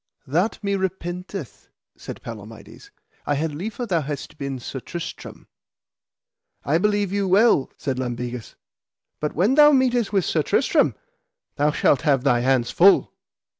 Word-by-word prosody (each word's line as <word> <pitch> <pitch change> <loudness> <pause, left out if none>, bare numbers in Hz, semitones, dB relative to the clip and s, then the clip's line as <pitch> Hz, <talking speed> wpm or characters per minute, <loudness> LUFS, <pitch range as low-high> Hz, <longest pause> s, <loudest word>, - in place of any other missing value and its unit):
That 175 +11 0
me 200 0 0
repenteth, 180 - -5 0.3
said - - -9
Palamides. 110 -1 -11 0.4
I 145 - +1
had 155 +1 -2
liefer 215 - -5
thou 175 -7 0
hadst 145 +1 -6
been 140 -1 -4
Sir 130 +2 -6
Tristram. 170 +6 -8 1.2
I 155 +4 +2
believe 205 -1 0
you 200 -1 0
well, 195 - +4
said 130 -2 -3
Lambegus, 120 -1 -5 0.6
but 150 - -3
when 195 - +2
thou 295 +1 +7
meetest 250 -5 +2
with 195 -5 +1
Sir - - +1
Tristram - - +2 0.6
thou 145 +1 +3
shalt 145 -3 +2
have 140 -5 +2
thy 125 -4 +3
hands 125 -1 +1
full. 195 +3 +4
160 Hz, 140 wpm, -23 LUFS, 135-200 Hz, 1.2 s, thou